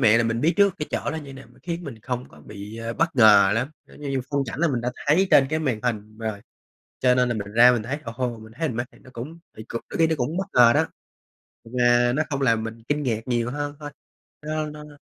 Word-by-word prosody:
mạng 115 -2 +5
là 115 - +2
mình 115 0 -1
biết 160 +5 +3
trước 200 -2 +4
cái 150 - -3
chỗ - - -2
đó 160 - -4
như 140 -3 -8
nào, 135 0 -12
m - - -22
khiến 175 0 -4
mình 115 -7 -8
không 125 0 -4
có - - -17
bị, 105 +1 -9
ơ, 115 0 -4
bất 165 -2 0
ngờ 105 -4 +7
lắm, 120 +4 0 0.2
giống - - -16
như 145 - -5
như 135 -1 0
phong 140 -1 +1
cảnh 120 - -5
là 170 - +3
mình 125 -5 -1
đã 125 +1 -2
thấy 175 +7 +4
trên 135 - +6
cái 155 - +1
màn 130 -8 -1
hình 110 -3 -3
rồi, 110 -3 -4 0.6
cho 125 -1 +4
nên 125 0 +3
là 120 - +1
mình 105 -1 -5
ra 120 +2 +8
mình 115 -3 -1
thấy, 135 +5 -3
ồ 115 - -6
hô, 125 -2 -2
mình 110 0 -13
thấy 165 - +1
mình 115 - -5
mê, 120 - 0
thì - - -19
nó - - -15
cũng 150 +8 -7 0.2
thì 110 - -7
cũng 115 - -4
đôi - - -5
khi 165 - +4
nó 160 - +1
cũng 140 +6 -2
bất 190 - -1
ngờ 120 -1 +7
đó, - - +2 0.9
mà 120 0 +4
nó 155 - +2
không 140 -1 -2
làm 115 -4 +3
mình 115 0 -7
kinh 150 0 0
ngạc 115 -5 -1
nhiều 120 -1 0
hơn 145 +1 -4
thôi. 145 -1 -6 0.6
Nó 155 0 -1
nó 150 0 -8
nó 145 -1 -14
125 Hz, 285 wpm, -24 LUFS, 115-150 Hz, 0.9 s, ra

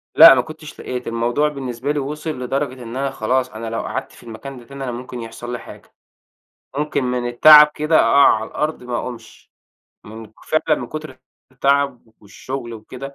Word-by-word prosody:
لأ - - +11
ما - - +2
كنتش - - -11
لقيت، 125 -1 -5
الموضوع 120 +6 0
بالنسبة 135 -1 -4
لي 150 - -1
وصل 150 +3 -5
لدرجة 130 0 -3
إن 115 +1 -8
أنا 135 +1 -2
خلاص، 130 +1 -1
أنا 115 +1 -7
لو 115 - -3
قعدت - - -5
في - - -17
المكان 120 +4 -9
ده 120 - -13
تاني 140 +2 -8
أنا 130 - -3
ممكن 125 0 -7
يحصل 115 +1 -8
لي 120 - -4
حاجة، - - -14 0.8
ممكن 150 -2 -1
من 125 -1 -1
التعب 150 +5 +8
كده 155 +2 0
أقع 140 - +5
على 110 0 -4
الأرض 155 +1 -3
ما 125 -1 -3
أقومش. 115 -3 -9 0.5
من 110 +1 -10
ك 105 - -24
فعلًا 155 0 +1
من 125 - -5
كُتر 155 +3 -7
ال 130 - -16 0.4
التعب 140 -1 +1 0.2
والشغل 120 +4 -7
وكده، 130 +5 -9
125 Hz, 190 wpm, -20 LUFS, 120-140 Hz, 0.8 s, لأ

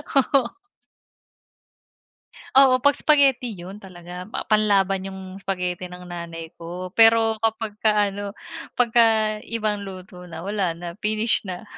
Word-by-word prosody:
Oo. 270 -2 +3 2.1
Oo, 270 -2 +7
'pag 285 -1 +5
spaghetti 275 -5 +3
yun 180 +3 -8
talaga 180 -1 -9
pa - - -3
panlaban 195 -3 +2
yung 190 0 -8 0.2
spaghetti 180 -2 -3
ng 180 0 -11
nanay 170 -1 -6
ko. 175 +2 -7
Pero 225 0 +5
kapag 225 -1 -1
ka 215 - +5 0.2
ano 205 +1 -6 0.5
pagka 225 -3 +3
ibang 215 -3 -2
luto 185 -1 -10
na 165 -1 -8
wala 195 -4 -1
na 175 +1 -8
finish 215 +2 0
na. 180 +2 -6
200 Hz, 125 wpm, -23 LUFS, 180-225 Hz, 2.1 s, Oo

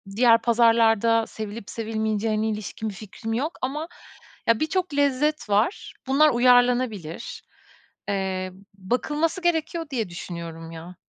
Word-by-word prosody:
diğer 230 0 +5
pazarlarda 230 -1 +4
sevilip 215 -1 -7
sevilmeyeceğine 220 -1 -1
ilişkin 215 +1 -4
bir - - -7
fikrim 220 +2 -6
yok 285 +8 -2
ama, 295 +5 -3 0.6
ya, 230 -1 +4
birçok 350 +1 -1
lezzet 285 -1 +1
var. 210 - 0
Bunlar 290 +3 +5
uyarlanabilir. 245 - +2 0.7
Eee, 190 -2 -2 0.2
bakılması 295 - -1
gerekiyor 330 -1 0
diye 225 -7 -2
düşünüyorum, 170 -2 -7
ya. 165 +2 -9
230 Hz, 115 wpm, -24 LUFS, 205-265 Hz, 0.7 s, diğer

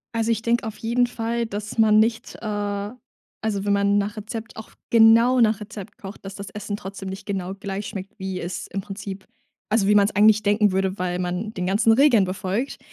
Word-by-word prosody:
Also, 230 0 +1
ich 225 -1 0
denke 235 +1 +1
auf 215 - -7
jeden 235 +2 +1
Fall, 235 0 -2
dass 210 0 -6
man 215 -1 +5
nicht, 225 +1 0
äh 205 -1 -3 0.5
also, 205 -3 -1
wenn 205 - 0
man 200 0 +3
nach 205 +1 -1
Rezept 225 +2 -7
auch 220 - -9 0.2
genau 230 +2 +6
nach 220 -3 +3
Rezept 210 -2 -9
kocht, 195 0 -10
dass 195 0 -7
das 200 -1 -7
Essen 205 0 -5
trotzdem 195 -1 -8
nicht 190 +1 -7
genau 190 -2 -3
gleich 195 +1 -5
schmeckt, 195 +2 -8
wie 190 -1 -4
es 175 +2 -5
im 195 - -4
Prinzip 195 0 -7 0.5
also 215 -2 +3
wie 210 - +5
man's 205 0 +4
eigentlich 215 +1 +6
denken 205 0 +3
würde, 190 +1 0
weil 180 0 -2
man 180 +4 -3
den 180 -3 -3
ganzen 210 +4 +3
Regeln 240 -5 +5
befolgt. 190 +7 -3
205 Hz, 205 wpm, -23 LUFS, 195-225 Hz, 0.5 s, genau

